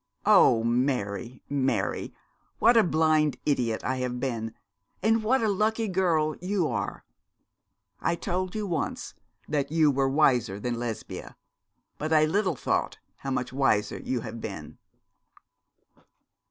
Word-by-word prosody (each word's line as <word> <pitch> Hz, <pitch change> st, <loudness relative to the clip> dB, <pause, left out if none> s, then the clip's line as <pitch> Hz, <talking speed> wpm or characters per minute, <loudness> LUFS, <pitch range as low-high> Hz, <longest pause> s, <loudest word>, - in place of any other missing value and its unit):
'Oh, 115 Hz, -1 st, +6 dB
Mary, 120 Hz, -1 st, -1 dB
Mary, 135 Hz, -2 st, -1 dB, 0.5 s
what 240 Hz, -, +5 dB
a 225 Hz, -, +7 dB
blind 155 Hz, -3 st, +2 dB
idiot 120 Hz, -6 st, 0 dB
I 130 Hz, -, -1 dB
have 125 Hz, -1 st, -3 dB
been, 115 Hz, -4 st, -3 dB, 0.5 s
and 225 Hz, +1 st, +3 dB
what 240 Hz, +2 st, +2 dB
a -, -, +2 dB
lucky 215 Hz, +2 st, +1 dB
girl 170 Hz, -5 st, +1 dB
you 185 Hz, -1 st, 0 dB
are! -, -, -4 dB, 0.9 s
I -, -, 0 dB
told 180 Hz, +2 st, -3 dB
you 215 Hz, -1 st, -2 dB
once 175 Hz, -4 st, -3 dB, 0.3 s
that 145 Hz, -2 st, -1 dB
you 155 Hz, -2 st, +4 dB
were 135 Hz, 0 st, +1 dB
wiser 125 Hz, -8 st, +2 dB
than 120 Hz, +2 st, -3 dB
Lesbia, 120 Hz, -2 st, -6 dB, 0.6 s
but 155 Hz, +1 st, -3 dB
I 155 Hz, -1 st, +5 dB
little 185 Hz, +1 st, +1 dB
thought -, -, -1 dB, 0.2 s
how 135 Hz, -, -6 dB
much 125 Hz, -1 st, -2 dB
wiser 130 Hz, -6 st, +1 dB
you 125 Hz, -2 st, -2 dB
had 115 Hz, 0 st, -7 dB
been.' 95 Hz, -8 st, -7 dB
140 Hz, 135 wpm, -27 LUFS, 120-175 Hz, 0.9 s, a